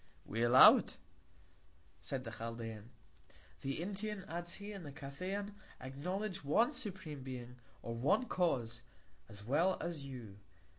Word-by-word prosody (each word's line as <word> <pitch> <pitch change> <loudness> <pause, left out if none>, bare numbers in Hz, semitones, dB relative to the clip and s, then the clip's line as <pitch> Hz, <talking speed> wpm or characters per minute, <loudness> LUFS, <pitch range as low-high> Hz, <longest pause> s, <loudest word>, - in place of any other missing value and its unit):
We 115 +3 -2
allow 120 +2 +10
it, - - -5 1.0
said 130 -2 -3
the 115 - -6
Chaldean. 115 -1 -6 0.7
The 135 +2 -3
Indian, 200 +1 -4
adds 175 +1 -3
he, 205 +1 -7
and 195 -3 -7
the 145 - -7
Cathayan, 185 +9 -4 0.3
acknowledge 180 +10 -3
one 220 - +4
supreme 185 - -4
Being, 125 -1 -7 0.3
or 115 - -3
first 175 - +2
Cause, 120 -10 +1 0.5
as 100 0 -10
well 165 +10 +3
as 165 -4 -4
you. 120 -7 -8
140 Hz, 135 wpm, -36 LUFS, 120-190 Hz, 1.0 s, allow